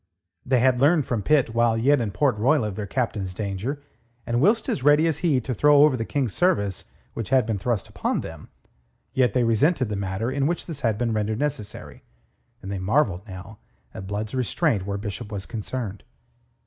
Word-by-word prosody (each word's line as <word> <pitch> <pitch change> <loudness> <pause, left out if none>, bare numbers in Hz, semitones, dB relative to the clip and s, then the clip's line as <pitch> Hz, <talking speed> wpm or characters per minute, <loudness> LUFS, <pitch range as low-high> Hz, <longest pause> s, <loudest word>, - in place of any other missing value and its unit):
They 125 -1 +2
had 130 -1 +3
learnt 150 +1 +4
from 115 -4 -1
Pitt 135 -3 +2
while 115 -1 +2
yet 135 +4 +3
in 110 - -1
Port 130 +4 +1
Royal 125 +4 +2
of 105 -3 -4
their 105 -1 -4
Captain's 100 -6 -2
danger, 105 +9 -4 0.4
and 120 +1 0
whilst 215 +8 +3
as - - -1
ready 145 +2 +5
as 160 -3 0
he 155 -7 +2
to 130 +2 -3
throw 145 +5 +5
over 150 -3 +4
the 115 -2 -3
King's 130 -6 -1
service 100 - 0 0.3
which 115 - -5
had 130 -3 +3
been 110 -3 -2
thrust 115 0 -1
upon - - -2
them, - - -9 0.6
yet 125 -5 +2
they 125 - +3
resented 125 +3 +2
the 105 - -2
manner 100 +4 -2
in 140 +1 0
which 170 +1 -2
this 160 -5 -7
had 110 -3 +1
been 115 0 -1
rendered 110 0 -1
necessary, 115 -7 -4 0.6
and 95 - -6
they 100 - -3
marvelled 100 -1 +1
now 95 +2 -10 0.3
at 95 - -8
Blood's 105 +2 -4
restraint 125 - 0
where 100 0 -2
Bishop 105 +2 -6
was 100 -2 -5
concerned. 110 -3 -5
115 Hz, 200 wpm, -24 LUFS, 105-140 Hz, 0.6 s, ready